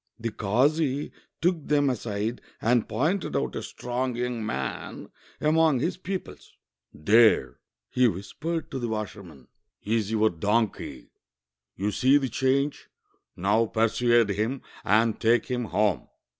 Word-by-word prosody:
The 115 0 -3
kazi 135 +8 +1 0.3
took 170 -3 0
them 145 -1 +3
aside 115 -2 -2 0.2
and 120 0 +1
pointed 175 +7 -1
out - - -1
a - - -3
strong 125 0 -3
young 120 -1 -2
man 110 - -4 0.3
among 155 -2 +3
his 165 +9 -1
pupils. 185 +1 -6 0.4
'"There," 110 +9 +4 0.3
he 125 - +3
whispered 150 - -4
to 135 - -3
the 120 - -2
washerman, 100 - -6 0.4
76 - - -33 0.2
THE 110 - -2
WASHERIVIAN 110 -2 +3
AND 80 - -19
THE - - -2
DONKEY 110 -1 +1
"is - - -7
your - - -10
donkey. - - -30 0.6
You 100 +2 -1
sec 135 +6 +4
the 135 - -1
change: 135 +4 0 0.5
now 105 +5 +2
persuade 115 0 +2
him 110 +7 -2 0.2
and 110 +2 +2
take 115 +1 +3
him 125 -2 -2
home." 105 -3 0
120 Hz, 150 wpm, -26 LUFS, 110-135 Hz, 0.6 s, There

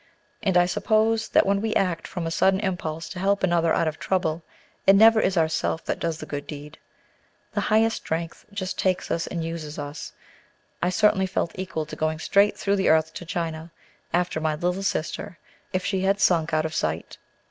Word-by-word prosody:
And 190 -5 +2
I 175 - +5
suppose 220 +4 +1
that - - +4
when 200 0 +1
we 220 0 -1
act 180 -4 0
from 175 -3 -5
a 165 - -2
sudden 190 +3 +3
impulse 165 -5 -3
to 180 - -7
help 200 +1 +1
another 170 -3 +2
out 165 - +2
of 155 0 -3
trouble, 170 -3 0 0.5
it 195 - +8
never 220 +2 +7
is 185 -1 +1
ourself 160 0 0
that - - -2
does 165 -2 -2
the 155 - -7
good 145 -1 -6
deed. 150 +1 -9 0.7
The - - 0
Highest 220 +1 +2
Strength 165 +1 -4
just 190 -2 -4
takes 185 -1 0
us 165 - -1
and 170 -2 -3
uses 160 -2 -5
us. 145 +1 -6 0.7
I 175 - +2
certainly 190 0 +3
felt 185 -3 -1
equal 185 -4 -4
to 155 - -8
going 155 0 -1
straight 200 +6 +3
through 200 0 0
the 195 - +2
earth 160 0 +3
to 175 - -7
China 165 -1 -4 0.4
after 175 -2 0
my 155 -1 0
little 180 +4 -1
sister, 195 +1 -3 0.3
if 185 -1 -2
she 190 -2 0
had 195 +1 +2
stink 165 -4 +3
out 155 0 +1
of 160 - -3
sight. 80 - -3
175 Hz, 200 wpm, -25 LUFS, 160-195 Hz, 0.7 s, it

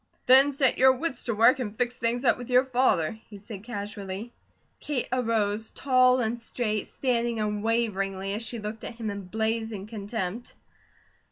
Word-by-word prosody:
"Then 265 +3 +7
set 270 -2 +2
your 260 0 +7
wits 265 -1 -3
to 230 - -1
work 230 +5 +5
and 215 -4 -4
fix 245 0 0
things 240 +2 -1
up - - +5
with 245 - -8
your 250 +1 +4
father," 250 -11 +2 0.2
he 210 - -10
said 205 0 -10
casually. 205 0 -6 0.5
Kate 285 -5 -2
arose 225 -3 0
tall 255 -1 +3
and 235 +1 -1
straight, 220 -3 -2
standing 235 -3 -1
unwaveringly 210 -2 -1
as 210 - -2
she 230 +1 -3
looked 215 0 -6
at - - -6
him 225 -2 -4
in 200 -1 -7
blazing 220 0 -2
contempt. 210 0 -5
230 Hz, 165 wpm, -27 LUFS, 210-245 Hz, 0.5 s, Then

